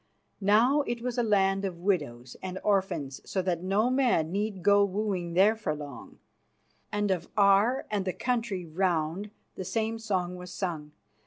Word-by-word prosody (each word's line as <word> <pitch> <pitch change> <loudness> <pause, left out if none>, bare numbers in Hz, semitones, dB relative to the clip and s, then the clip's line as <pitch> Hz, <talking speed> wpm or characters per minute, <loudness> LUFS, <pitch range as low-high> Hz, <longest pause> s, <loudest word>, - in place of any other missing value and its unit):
Now 230 +9 +4
it 240 0 -3
was 250 -1 -2
a - - +4
land 195 -3 +2
of 185 -3 -3
widows 145 -10 -2
and 185 0 -5
orphans, 190 -9 0
so 190 - -2
that 175 -2 -1
no 200 +6 +1
man 245 -12 +2
need 200 -1 -2
go 200 0 +5
wooing 190 -4 -2
there 200 +4 +5
for 215 -9 -2
long, 145 -3 -9 0.7
and 205 -1 0
of 175 -2 -2
Aar 205 +6 +4
and 205 -2 0
the 185 - -1
country 230 -7 -2
round 170 +2 -1 0.2
the 190 - -6
same 225 +4 -2
song 185 -5 -2
was 180 0 -9
sung. 165 -6 -4
195 Hz, 165 wpm, -28 LUFS, 175-215 Hz, 0.7 s, go